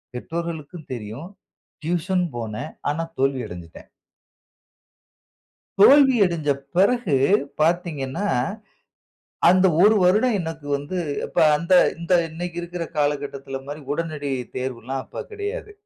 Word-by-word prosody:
பெற்றோர்களுக்கும் 165 +2 -6
தெரியும். 120 - -7 0.5
டியூஷன் 175 +3 0
போனேன். 115 +6 -5 0.2
ஆனா 165 +3 -2 0.2
தோல்வி 135 -1 +1
அடஞ்சுட்டேன். 85 -3 -11 1.9
தோல்வி 270 +5 +7
அடஞ்ச 165 -5 -2 0.3
பிறகு 200 - +3 0.5
பார்த்தீங்கன்னா, 165 -1 0 1.2
அந்த 185 +2 +5 0.2
ஒரு 210 +2 +7
வருடம் 210 +6 +3
எனக்கு 160 -3 -6
வந்து 145 +6 -5 0.3
இப்ப - - -6 0.2
அந்த 170 +4 -3 0.3
இந்த 170 +2 -2 0.2
இன்னக்கி 170 +2 -5
இருக்குற 175 0 -5
காலகட்டத்தில 145 -2 -2
மாறி 145 +2 -6
உடனடி 155 -3 -3 0.3
தேர்வு 130 -2 -3
எல்லாம் 135 +1 -3
அப்ப - - -7
கிடையாது. 420 +1 -5
165 Hz, 105 wpm, -23 LUFS, 140-180 Hz, 1.9 s, தோல்வி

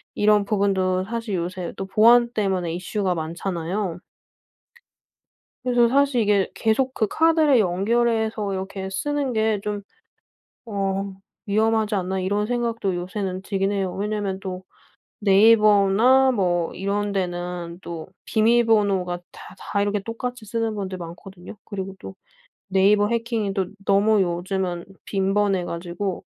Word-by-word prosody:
이런 210 0 +4
부분도 190 -3 +1
사실 225 -1 -3
요새 180 0 -4
또 195 - -4
보안 235 +4 +5
때문에 190 -6 -1
이슈가 185 +1 -2
많잖아요. 170 +2 -3 1.6
그래서 245 -2 +3
사실 275 -1 +2
이게 205 -2 +2
계속 255 +4 +1
그 215 - +1
카드를 320 -5 +4
연결해서 220 +2 +1
이렇게 190 0 -4
쓰는 285 +6 -1
게 220 -2 +1
좀 205 -1 -3 0.9
어 195 -1 -2 0.3
위험하지 220 0 +1
않나 190 0 -1
이런 205 +3 0
생각도 230 -4 -1
요새는 185 +1 -4
들긴 195 0 -1
해요. 195 -2 -1
왜냐하면 205 -1 -2
또 185 -1 -6 0.6
네이버나 215 +5 +5
뭐 175 -5 0
이런 200 +1 -2
데는 175 -2 -3
또 165 -2 -7 0.2
비밀번호가 215 -6 +2
다 190 - -12
다 200 +1 -2
이렇게 205 0 0
똑같이 230 +2 -5
쓰는 225 +1 -2
분들 190 -2 -4
많거든요. 175 +3 -10
그리고 195 -2 -6
또 190 - -9 0.5
네이버 200 +2 +3
해킹이 230 -3 -1
또 190 -2 -1 0.2
너무 200 +1 +4
요즘은 175 0 -2 0.2
빈번해 195 -1 +1
가지고 175 +3 -4
200 Hz, 280 characters per minute, -23 LUFS, 185-220 Hz, 1.6 s, 보안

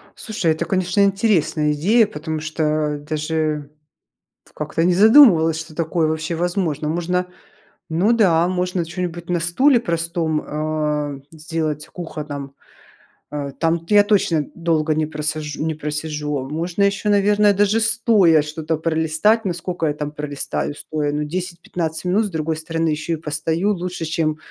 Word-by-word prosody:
Слушай, 210 -7 -1
это, 160 +2 -1
конечно, 185 +2 +1
интересная 190 -7 +2
идея, 210 +10 +4
потому 160 -5 -5
что 155 -1 -1
даже 155 -1 -2 0.8
как-то 150 +2 -2
не 180 0 +3
задумывалась, 185 - +6
что 155 -1 -9
такое 165 0 0
вообще 160 +2 -2
возможно. 170 -4 -1
Можно, 180 +3 -1 0.6
ну 180 +8 +2
да, 175 -7 +4
можно 180 -1 -1
чё-нибудь 175 0 -5
на 175 -1 0
стуле 240 - +3
простом, 165 -4 -1
э, 150 -2 -2
сделать 155 -1 -3
кухонном, 145 -5 -7 0.8
э, 145 -1 -4
там-то 165 +4 +1
я 205 - +8
точно 180 -8 +2
долго 160 -2 0
не 155 0 0
просаж 150 -1 -3
не 160 0 -2
просижу, 150 -2 -3
можно 170 +6 -1
еще, 200 +1 +1
наверное, 205 0 +4
даже 205 +2 +3
стоя 215 -7 +4
что-то 155 +1 -3
пролистать, 160 +7 +1
ну, 180 - 0
сколько 175 -1 -3
я 145 - 0
там 150 -1 -4
пролистаю 145 -1 -4
стоя, 150 -1 -3
ну, 150 +1 -1
10-15 170 0 -4
минут, 200 +5 +2
с - - -7
другой 160 -1 -2
стороны 165 +1 -2
еще 155 +2 -2
и - - +1
постою, 160 +5 -1
лучше, 180 -2 -4
чем, 155 -1 -1
160 Hz, 145 wpm, -20 LUFS, 155-180 Hz, 0.8 s, я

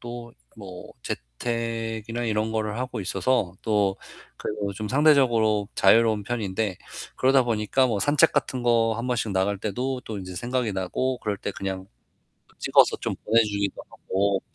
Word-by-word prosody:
또 120 0 -8 0.2
뭐 95 -4 -10
재택이나 115 - -4
이런 110 0 0
거를 110 0 -2
하고 125 -3 -3
있어서 95 0 0
또 105 -3 +1 0.4
그래도 105 -1 -4
요즘 100 +2 -5
상대적으로 120 -8 +3
자유로운 110 +1 +4
편인데 105 -3 -2 0.4
그러다 135 0 +4
보니까 115 +2 +1
뭐 110 -4 0
산책 145 +7 +4
같은 130 -2 -1
거 115 -2 +3
1 115 +2 -3
번씩 115 -4 -1
나갈 95 +1 0
때도 125 +6 -3
또 110 - -5
인제 95 -1 -8
생각이 120 +2 -1
나고 120 +7 -1
그럴 105 -4 -3
때 - - -3
그냥 95 0 -5 0.6
그 - - -27
찍어서 - - +4
좀 - - -3
보내 115 +2 +5
주기도 100 -2 -2
하고. 100 0 -1
110 Hz, 315 characters per minute, -25 LUFS, 100-120 Hz, 0.6 s, 보내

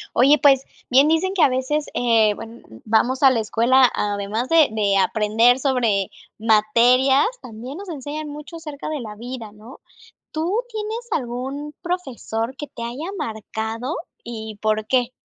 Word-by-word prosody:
Oye, 275 +5 +6
pues, 270 -2 +5 0.3
bien 270 +4 +6
dicen 325 +4 +1
que 380 - 0
a 285 - +6
veces, 260 +4 -1
eh, 225 -3 +3
buen 225 +3 -10 0.2
vamos 240 +5 +1
a 270 - +8
la 240 - +1
escuela, 240 +4 +4
además 205 +3 -2
de 325 -1 +5
de 205 -2 +1
aprender 220 +4 +3
sobre 240 -8 0 0.3
materias, 235 +5 +4 0.2
también 245 +7 -8
nos 400 -1 -8
enseñan 300 0 -5
mucho 300 +3 -9
acerca 300 -3 -7
de 310 -1 -3
la 215 -4 -7
vida, 235 -1 -7
¿no? 215 +5 -14 0.5
¿Tú 350 +9 -1
tienes 440 +2 -5
algún 270 +4 -4
profesor 265 -9 -3
que 295 - -6
te 235 - -8
haya 250 +8 -5
marcado 225 - -4 0.3
y 220 -2 -7
por 215 0 0
qué? 250 0 +1
250 Hz, 155 wpm, -22 LUFS, 220-295 Hz, 0.5 s, a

